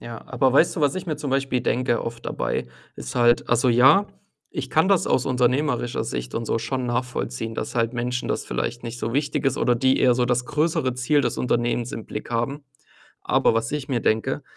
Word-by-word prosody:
Ja, 115 -1 -8
aber 130 0 +1
weißt 170 +5 +4
du, - - -2
was 145 -1 +2
ich 185 - -5
mir 155 -3 -2
zum 140 - -4
Beispiel 135 -2 0
denke 120 -1 0
oft 115 0 -7
dabei, - - -2 0.3
ist 60 - -7
halt 120 0 +3
also 120 +1 +3
ja, 130 +12 +6 0.4
ich 135 -2 -5
kann 160 +7 +3
das 195 -3 +3
aus 130 - +1
unternehmerischer 125 0 0
Sicht 60 0 -5
und 115 - -2
so 115 - 0
schon 130 +1 -3
nachvollziehen, 125 -1 -3
dass - - -5
halt 115 -1 +1
Menschen 125 +1 -2
das - - -2
vielleicht 115 - -3
nicht 120 +1 -6
so 115 -1 -3
wichtig 145 +2 -1
ist 135 -1 +1
oder 125 - +2
die 130 +2 +2
eher 125 -1 +4
so 125 0 +1
das 125 0 0
größere 150 -4 0
Ziel 145 +4 +2
des - - -1
Unternehmens 120 0 0
im 115 -6 -6
Blick 105 - -7
haben. 120 +5 -2 0.6
Aber - - +2
was 115 +3 -1
ich 150 -3 -3
mir 125 -4 0
denke, 115 +7 0
125 Hz, 215 wpm, -23 LUFS, 120-135 Hz, 0.6 s, ja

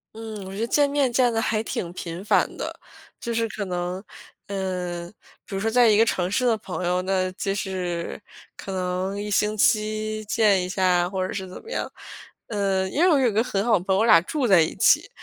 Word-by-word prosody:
嗯， 220 -3 -7
我 190 - -8
觉 200 - -6
得 230 - 0
见 290 +3 +3
面 280 -3 +1
见 245 -1 +3
得 225 - +1
还 220 -1 0
挺 175 -5 -4
频 175 +1 -6
繁 - - +2
的。 - - -6 0.4
就 235 - -4
是 230 0 0
可 205 -1 -4
能 180 +1 -3 0.4
嗯， 180 -3 -4 0.4
比 195 - -7
如 - - -1
说 225 +2 0
在 245 -1 +5
一 210 - +4
个 225 - +5
城 180 -4 0
市 250 +5 +1
的 230 -2 +4
朋 185 -3 -5
友， 180 +1 +1
那 185 0 0
就 195 +1 -3
是 180 -1 -4 0.3
可 195 - -8
能 185 +2 -2
1 210 0 -4
星 210 +2 +1
期 215 -4 +1
见 205 -3 +3
一 180 - -4
下， 180 -2 +2
或 190 -1 -2
者 - - -6
是 190 -2 -4
怎 - - -9
么 460 - -11
样。 - - -3 0.6
嗯， 195 -3 0
因 300 - 0
为 360 - +6
我 300 - +5
有 245 -4 +3
个 220 +3 +2
很 200 -4 -1
好 220 -6 +4
的 - - -9
朋 190 0 +1
友， - - +2
我 225 - +3
俩 215 -7 +7
住 275 - -2
在 185 -5 +6
一 160 - 0
起， - - +4
200 Hz, 245 characters per minute, -24 LUFS, 185-225 Hz, 0.6 s, 俩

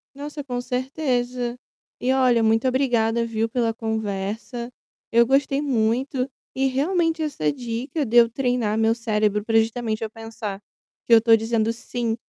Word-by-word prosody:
Nossa, 290 +1 -6
com 245 -2 -3
certeza. 250 -1 -2 0.5
E, 255 - +1
olha, 250 -3 +3
muito 225 +3 +2
obrigada, 235 -3 +1
viu, 225 -1 -1
pela 230 -1 0
conversa. 220 +2 -4 0.4
Eu 235 +1 +5
gostei 275 +2 +2
muito, 255 0 0 0.3
e 270 +1 +1
realmente 325 +4 0
essa 155 - -1
dica 250 - -3
de 240 0 +1
eu 230 -1 +7
treinar 245 -4 0
meu 225 +1 +3
cérebro 210 -3 0
para 225 0 +3
justamente 225 -1 -1
eu 220 - -3
pensar 225 -3 -7 0.5
que 235 - +3
eu - - +10
estou 225 0 +5
dizendo 225 0 0
"sim" 230 -1 -3
235 Hz, 150 wpm, -23 LUFS, 225-260 Hz, 0.5 s, eu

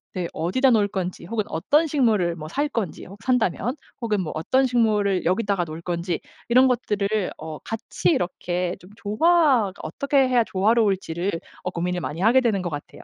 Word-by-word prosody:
네. 180 -2 -2
'어디다 250 +12 +2
놓을 210 -3 +3
건지.' 185 -3 -4
혹은 215 +2 -1
'어떤 290 - +2
식물을 220 - +2
뭐 155 0 -7
살 285 - -1
건지.' 215 - -4 0.2
산다면 245 - +1 0.3
혹은 210 -4 0
뭐 160 - -4
'어떤 260 +12 +2
식물을 210 -7 +1
여기다가 195 0 +1
놓을 160 0 -7
건지.' 175 -1 -2 0.3
이런 255 +2 +6
것들을 210 -4 0
어 155 -1 -7
같이 220 -5 -2
이렇게 180 0 -1
좀 180 - -16
조화가 250 - +3
어떻게 280 -2 +1
해야 245 -2 +3
조화로울지를 195 -4 +1 0.3
어 180 - -1
고민을 180 0 -2
많이 165 +4 -4
하게 240 +5 +5
되는 205 -6 +1
것 175 - -2
같아요. 145 0 -8
200 Hz, 360 characters per minute, -24 LUFS, 180-240 Hz, 0.3 s, 이런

